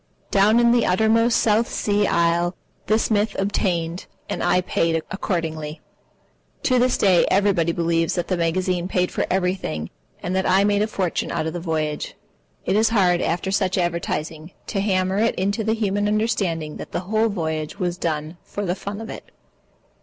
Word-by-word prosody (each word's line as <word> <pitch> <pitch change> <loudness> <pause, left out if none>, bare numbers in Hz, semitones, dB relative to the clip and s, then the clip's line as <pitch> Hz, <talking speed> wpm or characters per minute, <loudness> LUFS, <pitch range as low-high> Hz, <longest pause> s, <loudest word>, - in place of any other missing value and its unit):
Down 205 +4 +4
in 235 0 +5
the 240 -1 +3
uttermost 220 +5 +3
South 225 +2 +2
Sea 205 -1 +1
isle 170 +1 +1 0.3
this 220 +1 +1
myth 210 0 +1
obtained, 180 -4 -1 0.2
and - - -3
I 180 - +3
paid 165 -2 0 0.2
accordingly. 160 -6 -3 0.8
To 255 -1 +3
this 250 +1 +2
day 185 -3 +4
everybody 190 -4 +2
believes 165 -1 0
that 175 -2 -2
the 185 - 0
magazine 175 +1 0
paid 180 -1 0
for - - -1
everything 180 - -1 0.3
and 180 +1 -2
that 190 - +1
I 190 +2 +4
made 205 0 +2
a 215 - +2
fortune 190 -5 -2
out 155 - -1
of 160 - -3
the 175 - -3
voyage. 155 -3 -2 0.5
It - - +1
is 220 +1 +4
hard, 185 -6 +3
after 180 +3 -1
such 190 -1 +1
advertising, 165 -2 -2
to 195 - -2
hammer 190 -1 +1
it 230 +1 +2
into 200 +4 -1
the 220 +1 +1
human 205 -2 0
understanding 195 -8 -1
that - - -9
the - - -1
whole 220 +4 +1
voyage 160 -4 -3
was 180 -2 -2
done 155 0 -3
for 205 - -5
the 175 - 0
fun 200 +3 -6
of 225 - -7
it. - - -10
185 Hz, 175 wpm, -22 LUFS, 170-205 Hz, 0.8 s, in